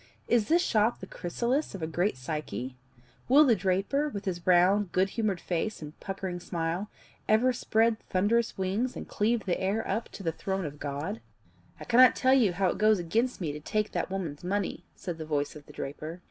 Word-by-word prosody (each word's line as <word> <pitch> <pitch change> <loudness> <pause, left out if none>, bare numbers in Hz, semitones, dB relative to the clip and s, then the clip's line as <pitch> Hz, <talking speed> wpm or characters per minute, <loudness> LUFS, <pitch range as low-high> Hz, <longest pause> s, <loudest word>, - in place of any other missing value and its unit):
"Is 230 -3 +3
this 345 +2 +4
shop 220 +2 +2
the - - -7
chrysalis 240 - -2
of 180 - -6
a - - +1
great 175 +2 0
psyche? 130 -3 -4 0.5
Will 290 +4 +7
the 240 -5 +5
draper, 195 +10 0
with 200 -7 -6
his 175 -2 -4
round 185 +2 +4
good 190 +1 +3
humoured 215 -5 -1
face 180 +6 -2
and 150 -1 -8
puckering 190 -2 -4
smile, 170 +4 -3 0.4
ever 235 +4 +4
spread 225 -1 +2
thunderous 220 +5 +1
wings 195 +7 -1
and - - -7
cleave 225 +2 0
the 180 - -1
air 200 +4 0
up 220 +4 -2
to 195 - -8
the 165 - 0
throne 190 +3 -3
of 145 -1 -7
God?" 145 +9 -4 0.6
"I - - -7
cannot 250 +1 +6
tell 260 -1 +3
you 230 -9 +4
how 190 +1 +1
it - - -3
goes 215 0 +5
against 225 +9 0
me 160 -4 -1
to 150 - -6
take 215 +7 -1
that - - -2
woman's 175 -6 -4
money," 200 +2 -2
said 170 -3 -6
the - - -3
voice 145 -1 -1
of 150 -1 -12
the - - -13
draper. 155 +5 -6
195 Hz, 200 wpm, -29 LUFS, 170-220 Hz, 0.6 s, Will